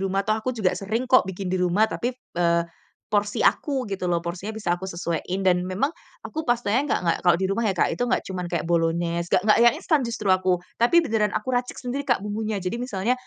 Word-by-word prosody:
rumah," 195 Hz, +1 st, 0 dB
toh 215 Hz, -, +1 dB
aku 255 Hz, +3 st, -3 dB
juga 195 Hz, -4 st, +1 dB
sering 220 Hz, +5 st, -2 dB
kok 255 Hz, -4 st, +4 dB
bikin 190 Hz, 0 st, -4 dB
di 185 Hz, -, +1 dB
rumah, 180 Hz, +4 st, +3 dB
tapi, 240 Hz, -, -2 dB
eee, 170 Hz, -8 st, 0 dB, 0.5 s
porsi 205 Hz, 0 st, 0 dB
aku 275 Hz, -4 st, +2 dB
gitu 195 Hz, -2 st, -4 dB
loh, 170 Hz, -1 st, +1 dB
porsinya 180 Hz, +5 st, -4 dB
bisa 175 Hz, -5 st, 0 dB
aku -, -, -5 dB
sesuaiin 170 Hz, +1 st, -3 dB
dan 180 Hz, -1 st, +4 dB
memang 185 Hz, +9 st, 0 dB, 0.4 s
aku 315 Hz, +1 st, -4 dB
pastanya 240 Hz, -2 st, +1 dB
nggak -, -, +1 dB
nggak, 170 Hz, -, +2 dB
kalau 175 Hz, -1 st, +5 dB
di -, -, +1 dB
rumah 230 Hz, +4 st, -1 dB
ya -, -, +2 dB
Kak -, -, +3 dB
itu. 245 Hz, -, -1 dB
Nggak -, -, +2 dB
cuman 185 Hz, -1 st, -4 dB
kayak 170 Hz, -3 st, -2 dB
bolognese, 170 Hz, 0 st, 0 dB
nggak 180 Hz, -, +4 dB
nggak 215 Hz, -, +5 dB
yang 240 Hz, -, +6 dB
instan 315 Hz, -3 st, +1 dB
justru 230 Hz, -4 st, -3 dB
aku, 185 Hz, -1 st, +2 dB, 0.2 s
tapi 245 Hz, +9 st, +5 dB
beneran 220 Hz, -6 st, +1 dB
aku -, -, -4 dB
racik 245 Hz, 0 st, -1 dB
sendiri 265 Hz, +3 st, -3 dB
Kak 245 Hz, -6 st, +3 dB
bumbunya. 215 Hz, 0 st, -2 dB
Jadi 180 Hz, +4 st, -3 dB
misalnya, 230 Hz, -2 st, -1 dB
200 Hz, 225 wpm, -24 LUFS, 180-240 Hz, 0.5 s, yang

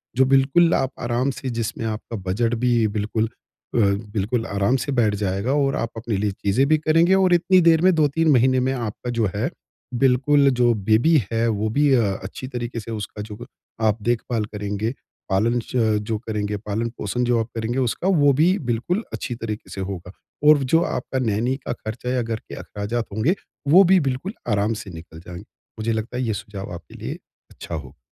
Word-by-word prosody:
जो 130 Hz, +1 st, +4 dB
बिल्कुल 135 Hz, +6 st, +4 dB
आप 130 Hz, -, +1 dB
आराम 120 Hz, +3 st, 0 dB
से 130 Hz, 0 st, -5 dB
जिसमें 115 Hz, -1 st, -3 dB
आपका 110 Hz, +1 st, -4 dB
बजट 115 Hz, +5 st, +1 dB
भी 120 Hz, -3 st, +3 dB
बिल्कुल 110 Hz, +2 st, 0 dB, 0.5 s
अ, -, -, +3 dB
बिल्कुल 105 Hz, +2 st, 0 dB
आराम 100 Hz, +5 st, +1 dB
से 140 Hz, -, -3 dB
बैठ 115 Hz, -6 st, +2 dB
जाएगा 100 Hz, +6 st, 0 dB
और 140 Hz, -1 st, +1 dB
आप 115 Hz, -, -2 dB
अपने 115 Hz, -1 st, -2 dB
लिए 105 Hz, +1 st, 0 dB
चीजें 100 Hz, +6 st, +1 dB
भी 155 Hz, +1 st, +4 dB
करेंगे 165 Hz, +4 st, +3 dB
और 190 Hz, -2 st, +4 dB
इतनी 180 Hz, +1 st, +4 dB
देर 165 Hz, -1 st, +5 dB
में 185 Hz, +1 st, +5 dB
2-3 160 Hz, +1 st, +2 dB
महीने 130 Hz, 0 st, +4 dB
में 130 Hz, -, +1 dB
आपका 120 Hz, -1 st, -4 dB
जो 115 Hz, -3 st, +1 dB
है, 120 Hz, +9 st, 0 dB, 0.4 s
बिल्कुल 135 Hz, +3 st, +4 dB
जो 120 Hz, -2 st, +3 dB, 0.2 s
बेबी 120 Hz, +10 st, +5 dB, 0.2 s
है 115 Hz, +1 st, +1 dB
वो 110 Hz, -1 st, 0 dB
भी 145 Hz, +5 st, +2 dB
अ, 105 Hz, -5 st, +2 dB
अच्छी 100 Hz, +6 st, -7 dB
तरीक़े 120 Hz, -2 st, -4 dB
से 115 Hz, +1 st, -8 dB
उसका 105 Hz, -1 st, -5 dB
जो 105 Hz, +3 st, -8 dB, 0.4 s
आप 105 Hz, +1 st, 0 dB
देखभाल 115 Hz, -1 st, 0 dB
करेंगे, 105 Hz, +1 st, -3 dB, 0.4 s
पालन 110 Hz, +5 st, +2 dB
च 120 Hz, -, -9 dB, 0.3 s
जो 110 Hz, -, 0 dB
करेंगे, 105 Hz, -2 st, -3 dB
पालन-पोषण 115 Hz, +2 st, -3 dB
जो 120 Hz, -1 st, +2 dB
आप 110 Hz, -, -1 dB
करेंगे 115 Hz, +3 st, -1 dB
उसका 130 Hz, +8 st, -1 dB
वो 150 Hz, -7 st, +4 dB
भी 170 Hz, +8 st, +3 dB
बिल्कुल 150 Hz, -, 0 dB
अच्छी 120 Hz, -, -4 dB
तरीक़े 110 Hz, -2 st, -6 dB
से 95 Hz, -, -5 dB
होगा। 90 Hz, -2 st, -6 dB, 0.4 s
और 150 Hz, 0 st, +8 dB, 0.2 s
जो 165 Hz, -, +6 dB
आपका 130 Hz, -, -3 dB
नैनी 120 Hz, +2 st, 0 dB
का -, -, 0 dB
खर्चा 115 Hz, +2 st, -6 dB
या 125 Hz, -, +1 dB
घर 115 Hz, -1 st, -2 dB
के -, -, -11 dB
अख़राजात 110 Hz, +3 st, -4 dB
होंगे, 110 Hz, -, +1 dB, 0.3 s
वो 180 Hz, +7 st, +8 dB
भी 185 Hz, 0 st, +5 dB
बिल्कुल 135 Hz, +11 st, -4 dB, 0.2 s
आराम 105 Hz, +2 st, +1 dB
से 100 Hz, -, -10 dB
निकल 80 Hz, -1 st, -11 dB
जाएँगे। 90 Hz, +2 st, -8 dB, 0.4 s
मुझे 115 Hz, +1 st, 0 dB
लगता 110 Hz, +3 st, -3 dB
है 125 Hz, -, -1 dB
ये 110 Hz, -, 0 dB
सुझाव 100 Hz, -4 st, -8 dB
आपके 85 Hz, -, -11 dB
लिए -, -, -5 dB, 0.4 s
अच्छा -, -, -7 dB
हो। -, -, -8 dB
115 Hz, 195 wpm, -22 LUFS, 105-135 Hz, 0.5 s, और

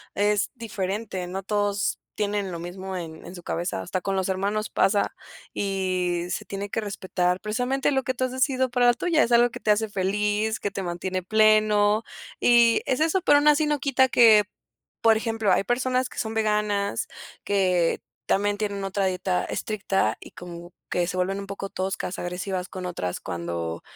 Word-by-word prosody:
es 205 Hz, 0 st, +1 dB
diferente, 200 Hz, -4 st, -4 dB
no 190 Hz, +2 st, -5 dB
todos 205 Hz, 0 st, 0 dB, 0.2 s
tienen 205 Hz, -2 st, -1 dB
lo 170 Hz, -, -5 dB
mismo 185 Hz, +2 st, -6 dB
en 160 Hz, -2 st, -8 dB
en 175 Hz, -, -9 dB
su 175 Hz, -, -9 dB
cabeza, 170 Hz, -, -3 dB
hasta 180 Hz, -, -3 dB
con 195 Hz, +2 st, -1 dB
los 190 Hz, -, 0 dB
hermanos 200 Hz, +3 st, -1 dB
pasa 200 Hz, 0 st, +1 dB, 0.4 s
y 185 Hz, -3 st, -1 dB
se -, -, -3 dB
tiene 200 Hz, +1 st, -5 dB
que 225 Hz, -, -2 dB
respetar, 185 Hz, -3 st, -1 dB
precisamente, 250 Hz, +6 st, 0 dB
lo 265 Hz, -1 st, +1 dB
que 260 Hz, -, -1 dB
tú 255 Hz, +1 st, -1 dB
has 255 Hz, -, -4 dB
decidido 260 Hz, 0 st, +1 dB
para 245 Hz, 0 st, +3 dB
la 240 Hz, -, +6 dB
tuya, 315 Hz, +5 st, +2 dB
es 235 Hz, -, -2 dB
algo 240 Hz, 0 st, +5 dB
que -, -, -9 dB
te 215 Hz, -, +3 dB
hace 215 Hz, +1 st, +2 dB
feliz, 210 Hz, +3 st, 0 dB
que 205 Hz, -, -3 dB
te 195 Hz, -, -4 dB
mantiene 185 Hz, +1 st, -3 dB
pleno, 215 Hz, +1 st, +4 dB, 0.4 s
y 235 Hz, -1 st, +5 dB
es 255 Hz, -, 0 dB
eso, 330 Hz, +4 st, +2 dB
pero 290 Hz, -, +5 dB
aún 290 Hz, +1 st, +3 dB
así 300 Hz, +1 st, +5 dB
no 295 Hz, -1 st, 0 dB
quita 265 Hz, -1 st, +3 dB
que, 220 Hz, -4 st, +7 dB, 0.6 s
por 225 Hz, -1 st, +5 dB
ejemplo, 225 Hz, -2 st, 0 dB
hay -, -, +2 dB
personas 255 Hz, +2 st, 0 dB
que -, -, -8 dB
son 220 Hz, -1 st, -2 dB
veganas, 210 Hz, -2 st, 0 dB, 0.4 s
que 185 Hz, -4 st, +2 dB, 0.3 s
también 205 Hz, +1 st, +1 dB
tienen 200 Hz, -2 st, -3 dB
otra 195 Hz, 0 st, -1 dB
dieta 185 Hz, 0 st, -1 dB
estricta 195 Hz, -, -1 dB
y -, -, -11 dB
como 175 Hz, 0 st, -10 dB, 0.2 s
que 175 Hz, -, +1 dB
se 180 Hz, -, -3 dB
vuelven 190 Hz, +2 st, 0 dB
un 200 Hz, -, -7 dB
poco 195 Hz, 0 st, -5 dB
toscas, 190 Hz, -1 st, -3 dB
agresivas 180 Hz, +1 st, -3 dB
con 185 Hz, -1 st, -6 dB
otras 90 Hz, -, -3 dB
cuando 85 Hz, -1 st, -4 dB
200 Hz, 185 wpm, -25 LUFS, 185-225 Hz, 0.6 s, que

